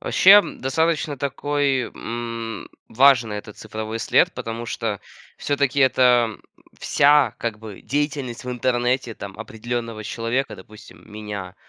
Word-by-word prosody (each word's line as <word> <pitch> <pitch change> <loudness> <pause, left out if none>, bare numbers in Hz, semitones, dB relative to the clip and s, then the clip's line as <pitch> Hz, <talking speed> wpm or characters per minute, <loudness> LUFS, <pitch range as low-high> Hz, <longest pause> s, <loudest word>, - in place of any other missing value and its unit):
Вообще, 190 - +4
м, 205 0 +5
достаточно 155 +1 0
такой, 140 -1 0
м, 115 -2 -5 0.2
важный 120 -4 +4
этот 105 0 -9
цифровой 110 +1 -5
след, 105 - +3
потому 115 +1 -5
что 115 -3 -3 0.4
всё-таки 140 -1 0
это 125 -4 +3 0.4
вся 145 -4 +4
как 115 -2 -3
бы 105 -3 -10
деятельность 140 -4 -3
в 125 - -4
интернете 125 0 0
там 100 -1 -9
определенного 115 0 -5
человека, 115 +3 -2
допустим, 105 +3 -15
меня. 105 -3 -7
120 Hz, 125 wpm, -22 LUFS, 110-135 Hz, 0.4 s, м